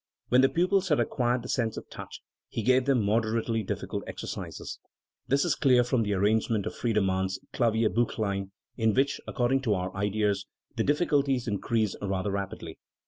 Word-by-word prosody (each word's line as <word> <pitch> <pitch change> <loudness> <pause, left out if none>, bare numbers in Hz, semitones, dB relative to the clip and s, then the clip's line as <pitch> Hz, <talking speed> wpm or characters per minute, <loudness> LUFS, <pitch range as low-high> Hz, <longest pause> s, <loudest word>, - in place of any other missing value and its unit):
When 125 +1 +5
the 135 - +5
pupils 185 +2 +1
had 150 - +3
acquired 120 -2 0
the - - -7
sense 115 -3 -1
of - - -7
touch, - - -9 0.3
he 115 - -3
gave 130 +1 +4
them 135 -5 +3
moderately 115 +1 +1
difficult 105 - -4
exercises. - - -6 0.5
This 140 +3 +2
is 170 - +2
clear 125 -4 +4
from 125 0 +1
the 105 -2 0
arrangement 105 +1 +1
of 110 - -3
Friedemann's 95 -4 0
Klavierbuchlein, 110 -4 +1 0.3
in 110 -3 +2
which, 135 +1 +1
according 130 +2 +1
to 110 -6 +1
our 90 0 -3
ideas, 100 0 0 0.3
the 115 - +1
difficulties 140 -4 +1
increase 110 0 0
rather 100 0 -1
rapidly. 100 -1 -5
115 Hz, 160 wpm, -28 LUFS, 100-130 Hz, 0.5 s, When